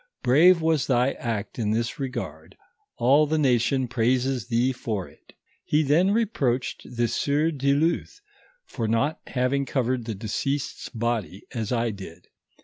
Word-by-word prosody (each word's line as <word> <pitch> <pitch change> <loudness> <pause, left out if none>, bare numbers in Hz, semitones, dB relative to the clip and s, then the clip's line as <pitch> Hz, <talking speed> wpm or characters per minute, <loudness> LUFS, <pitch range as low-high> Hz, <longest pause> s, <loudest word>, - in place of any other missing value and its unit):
Brave 160 +7 +5
was 160 -3 +2
thy 125 0 +3
act 110 -2 -4
in 105 -2 0
his 115 +4 -2
regard; 120 - -6 0.4
all 140 +5 +4
the 155 +2 0
nation 130 -1 +2
praises 125 +1 0
thee 120 +2 +2
for 110 -7 -4
it." - - -21 0.3
He 150 +1 +2
then 155 +7 +3
reproached 195 - 0 0.2
the 120 0 +2
sieur 145 +7 +1
du 140 -2 +1
Luth, 165 - 0 0.5
for 115 -4 -4
not 115 +8 0
having 130 +2 0
covered 130 -3 -1
the 110 -2 -4
deceased's 130 +7 -3
body, 115 -5 -3
as 115 -4 -3
I 120 -1 +1
did. 90 -4 -11
125 Hz, 145 wpm, -25 LUFS, 115-140 Hz, 0.5 s, Brave